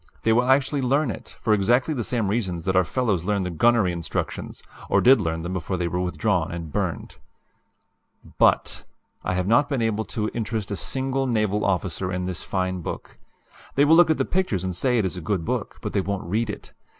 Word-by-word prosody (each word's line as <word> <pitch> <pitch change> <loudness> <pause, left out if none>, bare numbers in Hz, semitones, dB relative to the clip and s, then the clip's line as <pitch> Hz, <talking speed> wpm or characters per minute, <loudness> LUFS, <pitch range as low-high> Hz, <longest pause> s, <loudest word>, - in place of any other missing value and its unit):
They 115 - +4
will 125 +3 +2
actually 135 +1 +3
learn 135 +1 +1
it, - - -9
for 110 - +3
exactly 120 +9 +2
the 120 -5 -2
same 115 -2 -1
reasons 95 -6 -2
that 95 -1 0
our 95 - +5
fellows 95 0 0
learn 100 0 0
the 90 - -3
gunnery 105 +3 +3
instructions 85 -2 -4 0.3
or - - +4
did 130 -2 +6
learn 80 -3 -2
them 90 +2 -4
before 95 +1 -2
they 85 0 -1
were 90 +1 -2
withdrawn 90 -2 0
and 85 -3 -6
burned. - - -3 1.1
"B - - -3
U - - +8
T, - - -5 0.4
I 90 - -1
have 90 0 0
not 130 +8 +3
been 135 -5 0
able 110 -1 0
to 110 -1 -3
interest 110 -3 -3
a - - -1
single 135 +8 -2
naval 105 -3 0
officer 95 -1 -1
in 90 -1 -2
this 90 -2 -4
fine 95 -1 -2
book. - - -7 0.6
They 140 - +5
will 160 +2 +6
look 175 -1 +6
at 160 - +3
the - - 0
pictures 175 - 0
and 95 -1 -3
say 125 +6 +1
it 110 - +2
is 90 -1 -3
a - - -5
good 90 0 -2
book, - - -3
but - - -4
they 100 - +2
won't 100 0 -3
read 110 +6 -1
it. 105 - -7
105 Hz, 220 wpm, -24 LUFS, 90-120 Hz, 1.1 s, U